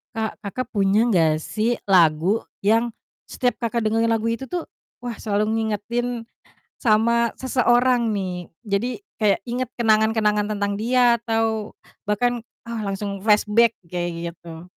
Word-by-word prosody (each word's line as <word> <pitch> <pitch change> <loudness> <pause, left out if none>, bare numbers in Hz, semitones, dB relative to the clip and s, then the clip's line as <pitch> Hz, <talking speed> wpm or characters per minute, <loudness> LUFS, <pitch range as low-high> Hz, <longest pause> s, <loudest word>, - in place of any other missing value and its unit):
Kak, 220 0 -4
Kakak 210 +6 -4
punya 205 +3 +3
gak 165 -8 +3
sih 225 +8 -1
lagu 175 +2 +4 0.2
yang, 225 +4 +2 0.4
setiap 250 -2 0
Kakak 235 0 0
dengerin 225 +1 +1
lagu 225 0 0
itu 230 +3 -2
tuh, 345 +5 -4 0.3
wah 245 -2 -5
selalu 215 +1 -1
ngingetin 230 +2 -2 0.5
sama 235 +1 +3
seseorang 250 -1 +2
nih. 180 -3 -4 0.2
Jadi 205 +3 0 0.3
kayak 205 -2 +3
inget 245 +1 -3
kenangan-kenangan 215 -2 +2
tentang 200 0 -1
dia 240 0 +3
atau 225 -2 -1 0.3
bahkan, 245 +3 +1 0.2
ah 230 -1 -5
langsung 200 0 -4
flashback, 215 +2 +3
kayak 170 0 -4
gitu. 165 -1 -11
220 Hz, 130 wpm, -23 LUFS, 200-235 Hz, 0.5 s, lagu